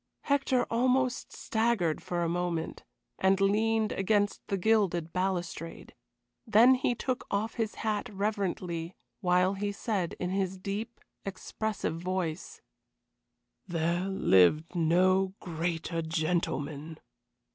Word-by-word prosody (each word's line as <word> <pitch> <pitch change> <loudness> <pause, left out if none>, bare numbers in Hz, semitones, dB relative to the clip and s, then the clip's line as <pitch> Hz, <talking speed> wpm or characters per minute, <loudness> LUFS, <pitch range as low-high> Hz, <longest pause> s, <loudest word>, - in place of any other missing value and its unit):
Hector 275 -3 +2
almost 255 +2 +1
staggered 220 -8 0
for 175 -1 -2
a - - +1
moment, 170 -1 -2 0.4
and 190 +1 +3
leaned 215 +2 +2
against 205 +1 +1
the 195 - 0
gilded 180 -5 +1
balustrade. 180 -3 -3 0.5
Then 225 +4 +7
he 250 -1 +1
took 255 +1 -3
off 210 +3 -1
his 225 -2 -2
hat 215 -2 -2
reverently, 190 -4 -2 0.2
while 180 +1 +3
he 205 +1 -2
said, 200 -4 -2
in 180 0 -2
his 190 -1 -1
deep, 205 +5 -5 0.2
expressive 195 -2 -3
voice: 180 -2 -3 1.1
"There 170 +1 0
lived 155 - +4
no 185 +3 +3
greater 165 0 -2
gentleman." 160 -2 -2
190 Hz, 110 wpm, -30 LUFS, 170-215 Hz, 1.1 s, Then